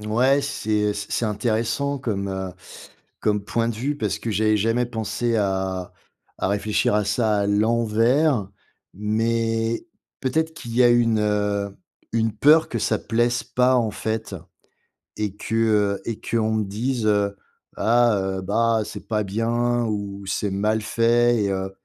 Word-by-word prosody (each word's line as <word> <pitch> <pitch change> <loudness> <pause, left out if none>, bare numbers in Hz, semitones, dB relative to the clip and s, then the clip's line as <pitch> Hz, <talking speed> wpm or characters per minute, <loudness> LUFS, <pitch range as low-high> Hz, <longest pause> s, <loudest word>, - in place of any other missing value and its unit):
n 105 - -8
ouais 130 +6 +3
c'est, 140 -6 -4 0.2
heu, - - 0
c 105 0 -5
c'est 120 - 0
intéressant 115 +6 -1
comme, 100 -6 -2
heu, 95 -1 -4 0.7
comme 105 -1 0
point 115 +1 0
de 115 - -2
vue. 140 +5 -2
Parce 105 -2 -1
que 115 - -4
j'avais 110 +1 +2
jamais 115 +4 +1
pensé 115 0 -2
à 95 -2 -1 0.5
à - - +1
réfléchir 105 +1 +1
à 105 -1 +2
ça 105 0 +1
à 100 - +1
l'envers. 115 +3 +2 0.5
Mais 115 - -1 0.3
peut-être 160 +5 0
qu'il 120 -7 -8
y 125 - +6
a - - +7
une, 115 -2 +3
heu, 105 -1 -1 0.4
une 115 -1 +1
peur 155 +8 +5
que 115 - -3
ça 110 0 0
plaise 120 +2 0
pas 125 +2 +2
en 115 -3 +1
fait 110 -2 -3 0.8
et 105 -2 -2
que, 110 - -4
heu 105 -3 +2
et 115 -2 -4
qu'on 110 -1 0
me 105 -2 0
dise, 115 +4 -2
heu: 100 -1 +2 0.4
«Ah, 120 -2 +3 0.2
heu, - - -5
bah 115 +3 +2
c'est - - -9
pas 105 -2 0
bien 120 +4 0
ou 100 -2 -4
c'est 100 +1 -1
mal 105 +3 0
fait» 115 +1 +2
et 100 - 0
heu 95 0 -3
110 Hz, 165 wpm, -23 LUFS, 105-120 Hz, 0.8 s, a